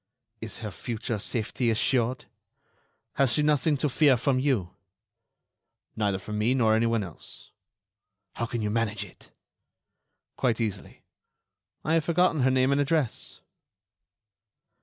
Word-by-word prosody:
"Is 110 Hz, -1 st, -6 dB
her 105 Hz, -, -4 dB
future 110 Hz, +4 st, -4 dB
safety 115 Hz, +3 st, -1 dB
assured? 120 Hz, +2 st, +1 dB, 0.9 s
Has 135 Hz, -4 st, +4 dB
she 150 Hz, -, +3 dB
nothing 150 Hz, 0 st, +2 dB
to 140 Hz, -, 0 dB
fear 140 Hz, -1 st, +4 dB
from 130 Hz, +2 st, +1 dB
you?" 130 Hz, -11 st, 0 dB, 1.2 s
"Neither 100 Hz, -3 st, 0 dB
from 105 Hz, +3 st, -5 dB
me, 120 Hz, +5 st, +2 dB
nor 115 Hz, -4 st, +3 dB
anyone 115 Hz, -1 st, +2 dB
else." 85 Hz, -5 st, -11 dB, 0.8 s
"How 115 Hz, -, -3 dB
can 115 Hz, -1 st, -3 dB
you 105 Hz, -, -1 dB
manage 110 Hz, -2 st, -1 dB
it?" 90 Hz, -, -17 dB, 1.1 s
"Quite 120 Hz, -4 st, +1 dB
easily. 110 Hz, -4 st, -4 dB, 0.8 s
I 155 Hz, -, +1 dB
have 165 Hz, -2 st, +2 dB
forgotten 170 Hz, -3 st, +2 dB
her 130 Hz, -, +4 dB
name 130 Hz, +1 st, +3 dB
and 140 Hz, +1 st, +3 dB
address." 145 Hz, -4 st, -1 dB
120 Hz, 130 wpm, -27 LUFS, 110-140 Hz, 1.2 s, Has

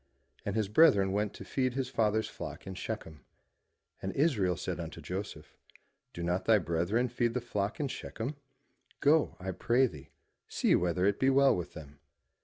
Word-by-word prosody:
And 100 Hz, -, -3 dB
his 110 Hz, -2 st, +1 dB
brethren 105 Hz, -5 st, +5 dB
went 105 Hz, +1 st, 0 dB
to -, -, -9 dB
feed 130 Hz, -2 st, -1 dB
his 135 Hz, -2 st, -1 dB
father's 110 Hz, -3 st, +1 dB
flock -, -, -8 dB
in 95 Hz, -, -6 dB
Shechem. 90 Hz, -6 st, -6 dB, 0.8 s
And 95 Hz, -, -2 dB
Israel 105 Hz, -, +2 dB
said -, -, -4 dB
unto -, -, -6 dB
Joseph, 95 Hz, +3 st, -6 dB, 0.6 s
Do 85 Hz, -, -6 dB
not 90 Hz, +2 st, -1 dB
thy 110 Hz, -1 st, +6 dB
brethren 85 Hz, +7 st, 0 dB
feed 120 Hz, -1 st, -1 dB
the -, -, +2 dB
flock 105 Hz, -3 st, -3 dB
in 145 Hz, -, 0 dB
Shechem? 125 Hz, +1 st, -5 dB, 0.6 s
Go, 150 Hz, +2 st, +3 dB
I 95 Hz, +1 st, -3 dB
pray 120 Hz, +8 st, +2 dB
thee, 75 Hz, -, -8 dB, 0.4 s
see -, -, +2 dB
whether 90 Hz, +1 st, +2 dB
it 100 Hz, 0 st, +2 dB
be 130 Hz, -, +4 dB
well 135 Hz, 0 st, +5 dB
with 90 Hz, -1 st, -5 dB
them. 75 Hz, -3 st, -11 dB
105 Hz, 175 wpm, -31 LUFS, 90-125 Hz, 0.8 s, thy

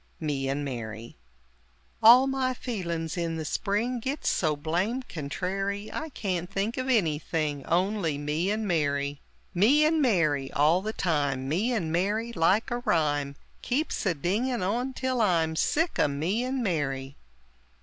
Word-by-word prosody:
Me 140 Hz, -4 st, -2 dB
and 145 Hz, +1 st, -2 dB
Mary 115 Hz, -3 st, -6 dB, 0.9 s
All 240 Hz, +4 st, +9 dB
my 265 Hz, -1 st, 0 dB
feelin's, 170 Hz, -10 st, -3 dB
in 165 Hz, -1 st, -2 dB
the 160 Hz, -, -4 dB
spring 220 Hz, +9 st, -1 dB
Gits 270 Hz, +5 st, -2 dB
so 155 Hz, -4 st, +1 dB
blame 175 Hz, -, -1 dB
contrary 195 Hz, -, -4 dB
I 315 Hz, -, -4 dB
can't 180 Hz, -, -3 dB
think 200 Hz, +4 st, -2 dB
of 255 Hz, 0 st, -2 dB
anything 155 Hz, -, 0 dB
Only 180 Hz, -3 st, +1 dB
me 150 Hz, +5 st, -1 dB
and 215 Hz, +1 st, -1 dB
Mary! 145 Hz, -4 st, 0 dB, 0.3 s
"Me 250 Hz, -, +5 dB
and 315 Hz, 0 st, +2 dB
Mary!" 155 Hz, -, +2 dB
all 155 Hz, +5 st, +3 dB
the 215 Hz, +2 st, -3 dB
time, 145 Hz, -9 st, -1 dB
"Me 190 Hz, -, 0 dB
and 185 Hz, -10 st, -1 dB
Mary!" 210 Hz, +7 st, 0 dB
like 190 Hz, +7 st, +2 dB
a 240 Hz, -, -1 dB
rhyme 145 Hz, -9 st, 0 dB, 0.3 s
Keeps 285 Hz, +6 st, -1 dB
a 175 Hz, -, +1 dB
dinging 215 Hz, -, -1 dB
on 245 Hz, +7 st, -1 dB
till 255 Hz, -2 st, -1 dB
I'm 165 Hz, -6 st, +2 dB
Sick 325 Hz, -, +1 dB
o' -, -, +4 dB
"Me 165 Hz, +11 st, -1 dB
and 255 Hz, 0 st, -2 dB
Mary!" 140 Hz, -7 st, -2 dB
180 Hz, 150 wpm, -27 LUFS, 150-235 Hz, 0.9 s, All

